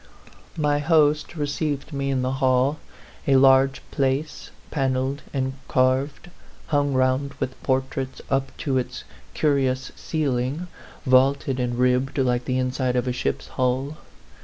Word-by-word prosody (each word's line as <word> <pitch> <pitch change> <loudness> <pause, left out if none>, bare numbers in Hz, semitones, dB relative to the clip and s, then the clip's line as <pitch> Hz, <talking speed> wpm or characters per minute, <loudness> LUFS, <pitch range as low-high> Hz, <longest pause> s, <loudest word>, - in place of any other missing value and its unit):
My 145 -2 +2
host 155 +1 +2
received 145 -1 -2
me 140 0 -2
in 130 -2 0
the 130 - 0
hall, 130 +3 +2 0.5
a 135 - +5
large 135 0 +5
place, 140 +3 -1 0.2
panelled 135 -1 -1
and 130 -1 -1
carved, 135 +6 +1 0.4
hung 145 -2 +1
round 130 +2 +1
with 130 -2 -5
portraits 130 0 -2
up 135 -1 0
to 135 -4 0
its 125 0 -5 0.3
curious 135 -3 +1
ceiling 140 +1 -2 0.4
vaulted 130 0 +3
and 120 -1 -1
ribbed 125 +2 +1
like 125 -2 +1
the 130 - 0
inside 130 0 0
of 125 +1 0
a 125 - 0
ship's 125 - -3
hull. 130 +4 -1
135 Hz, 135 wpm, -24 LUFS, 130-145 Hz, 0.5 s, a